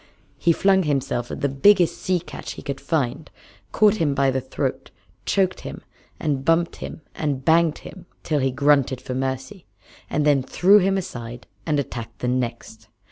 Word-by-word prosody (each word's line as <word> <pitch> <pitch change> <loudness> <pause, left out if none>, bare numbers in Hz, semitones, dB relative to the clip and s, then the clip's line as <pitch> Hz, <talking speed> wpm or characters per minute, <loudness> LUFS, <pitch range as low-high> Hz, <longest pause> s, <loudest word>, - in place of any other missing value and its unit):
He 170 - +3
flung 190 +3 +3
himself 135 -6 -1
at - - -6
the 140 - +2
biggest 175 +6 +4
sea 185 -1 0
catch 170 - -8
he - - -10
could 140 -1 -5
find, 145 -3 -2 0.4
caught 215 0 +4
him 150 -7 +1
by 135 -1 +3
the 130 0 -1
throat, - - -3 0.4
choked 190 -2 +1
him - - -8 0.4
and 145 -4 -1
bumped 165 +3 +1
him - - -8
and 140 -4 -3
banged 165 -1 +4
him 190 - -11 0.2
till 150 -2 0
he 135 0 +1
grunted 140 -1 +2
for 130 - -6
mercy, 130 +7 -4 0.4
and 150 0 0
then 145 -2 +4
threw 190 +10 +4
him 195 0 +1
aside 120 -9 -6 0.2
and 150 -2 +1
attacked 115 -4 -6
the 125 - -3
next. 120 -3 -3
145 Hz, 175 wpm, -23 LUFS, 130-170 Hz, 0.4 s, biggest